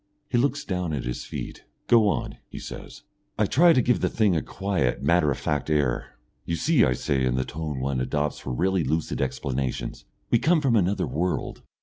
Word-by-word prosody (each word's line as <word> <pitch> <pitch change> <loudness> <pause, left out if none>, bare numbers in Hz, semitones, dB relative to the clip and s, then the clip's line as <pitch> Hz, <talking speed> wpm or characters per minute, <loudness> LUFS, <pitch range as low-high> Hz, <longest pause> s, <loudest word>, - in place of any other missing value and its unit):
He - - +2
looks 140 +3 0
down 90 -4 -2
at 70 - -2
his - - -4
feet. - - -7 0.2
"Go 115 -3 +5
on," 100 - -1
he - - -9
says. - - -9 0.3
I - - +3
try 170 +4 +5
to 130 -7 +4
give 125 - +2
the - - +1
thing 105 -5 +2
a 80 - +1
quiet, 95 -12 -1
matter 75 +1 +3
of 70 - 0
fact 75 0 -2
air. 70 -7 0 0.3
"You 85 - -2
see," 145 - +3
I 65 - +3
say, 65 +2 -1
in 65 -1 +1
the 65 0 0
tone 75 -3 -4
one 65 0 -1
adopts 75 +3 -1
for - - -6
really 90 +7 +1
lucid 80 +1 -1
explanations, 65 -1 -3 0.3
"we 120 - +5
come 165 +5 +3
from 135 -5 +2
another 100 -1 +2
world. 90 +5 -2
80 Hz, 205 wpm, -25 LUFS, 70-105 Hz, 0.3 s, Go